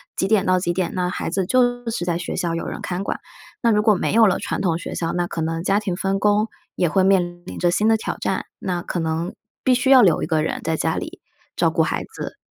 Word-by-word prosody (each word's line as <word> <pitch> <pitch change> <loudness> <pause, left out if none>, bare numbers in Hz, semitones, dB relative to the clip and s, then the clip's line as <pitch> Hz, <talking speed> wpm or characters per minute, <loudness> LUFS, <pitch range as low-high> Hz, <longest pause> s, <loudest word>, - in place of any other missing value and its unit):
几 190 - 0
点 205 -2 +3
到 185 0 +3
几 175 -1 -1
点， 175 -1 -1
那 180 -1 -1
孩 165 - -3
子 190 -1 -1
就 245 0 +2
是 175 -6 -3
在 175 -1 -1
学 175 - -4
校 175 -2 -1
有 165 - -3
人 - - -5
看 180 +1 -3
管。 - - -3 0.4
那 235 - +3
如 210 -1 +3
果 215 -1 +4
没 185 - -1
有 225 0 +6
了 190 - +2
传 - - -3
统 170 -4 +1
学 170 - -6
校， 165 -1 -2
那 175 0 0
可 170 - -4
能 165 +1 -2
家 195 +2 +2
庭 195 -4 -3
分 195 +1 -1
工， 210 +1 +3 0.3
也 175 - +2
会 190 +4 +2
面 175 -2 +2
临 - - -8
着 175 -1 +2
新 210 +5 +2
的 225 - +4
挑 - - -4
战， - - -1
那 180 -2 -3
可 175 - -3
能， 165 +2 -2 0.3
必 255 - +4
须 260 +2 +1
要 260 -3 +8
留 175 -6 +4
一 - - -2
个 155 -2 +1
人 - - -2
在 160 0 -1
家 160 +1 0
里， - - -6 0.4
照 - - +2
顾 - - +1
孩 - - 0
子。 - - -7
185 Hz, 290 characters per minute, -22 LUFS, 175-210 Hz, 0.4 s, 要